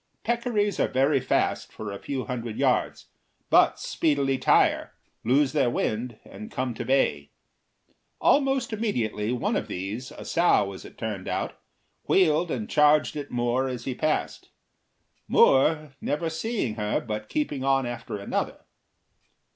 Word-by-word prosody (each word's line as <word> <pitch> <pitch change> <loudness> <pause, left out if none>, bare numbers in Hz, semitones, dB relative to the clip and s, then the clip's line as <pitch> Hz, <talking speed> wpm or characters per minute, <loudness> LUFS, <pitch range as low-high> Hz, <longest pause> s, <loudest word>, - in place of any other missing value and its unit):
Peccaries 230 -4 0
are - - +3
very 135 +2 +2
fast - - 0
for 105 -2 -6
a 100 - -6
few 135 -2 -4
hundred 115 -4 -5
yards, - - 0 0.4
but - - +5
speedily 140 -4 0
tire, - - +3 0.3
lose 135 +4 +2
their 120 - +2
wind, 115 0 -2
and 215 +1 -10
come 130 - -2
to - - -5
bay. 130 - +1 0.9
Almost 270 -4 +2
immediately 120 - -1
one 125 - -1
of - - -2
these, 105 +8 -5
a - - -10
sow, 165 - +2
as 95 - -10
it - - -13
turned 105 -4 -4
out, - - -3 0.5
wheeled 170 -2 +3
and 115 -8 -3
charged 150 +1 +4
at 145 -1 -5
Moore 120 +2 0
as 125 -2 -5
he 130 - -2
passed, 155 +4 -2 0.8
Moore 150 +1 +4
never 160 +2 -1
seeing 160 - -2
her 105 -1 0
but 105 -2 -5
keeping 145 -3 -2
on 135 -1 +2
after 120 -3 -5
another. 100 - -3
130 Hz, 145 wpm, -26 LUFS, 115-155 Hz, 0.9 s, but